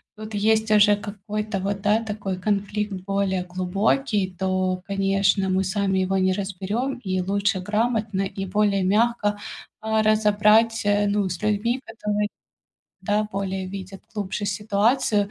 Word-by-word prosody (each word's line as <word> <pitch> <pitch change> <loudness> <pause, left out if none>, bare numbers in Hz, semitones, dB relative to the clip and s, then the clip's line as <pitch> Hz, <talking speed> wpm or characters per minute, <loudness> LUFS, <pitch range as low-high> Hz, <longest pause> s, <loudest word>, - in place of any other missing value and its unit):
тут 215 0 -9
есть 220 +1 +2
уже 210 0 +6
какой-то, 210 0 -4
вот 195 +1 -2
да, 210 +2 +2
такой 205 -4 -4
конфликт 205 +1 -1
более 190 0 -1
глубокий, 190 +3 0
то, 185 -1 0
конечно, 195 0 +1
мы 190 +1 +1
сами 190 0 0
его 190 +1 +1
не 185 0 +2
разберём, 200 +7 -3
и 185 -4 -2
лучше 200 +1 0
грамотно 215 0 0
и 195 0 -3
более 200 0 +1
мягко, 210 +1 +2 0.4
а, 220 0 +1
разобрать, 215 +1 +3
э, 205 0 +3
ну, 200 -1 +1
с 180 -2 -5
людьми, 215 +5 0
которые, 210 -2 -2 0.7
да, 210 0 +1
более 190 -1 -3
видят 195 0 -8
глубже 205 -1 -3
ситуацию. 210 +1 +1
205 Hz, 135 wpm, -24 LUFS, 190-215 Hz, 0.7 s, уже